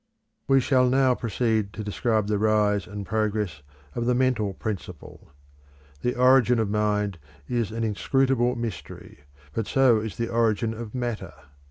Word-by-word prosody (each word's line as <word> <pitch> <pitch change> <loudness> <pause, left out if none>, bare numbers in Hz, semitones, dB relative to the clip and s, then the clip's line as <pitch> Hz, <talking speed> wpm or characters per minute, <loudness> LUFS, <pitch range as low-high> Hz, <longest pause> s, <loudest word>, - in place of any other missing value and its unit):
We 135 0 +5
shall 125 -1 +3
now 130 0 +3
proceed 110 -3 -1
to 110 - -6
describe 110 +1 0
the 105 0 -1
rise 105 -2 +2
and 100 +1 -6
progress 105 -5 -2 0.3
of 120 0 -2
the 125 - +3
mental 120 -6 +1
principle. 105 -4 -7 0.7
The 125 - -1
origin 125 -1 +5
of 110 -3 0
mind 105 -3 0 0.3
is 120 -4 -1
an 115 +1 -3
inscrutable 125 +3 +1
mystery, 100 - -7 0.3
but 115 - -2
so 130 -4 +4
is 110 -1 -6
the 115 0 -2
origin 115 -1 +1
of 115 0 -8
matter. 120 -3 -4
110 Hz, 150 wpm, -25 LUFS, 105-125 Hz, 0.7 s, We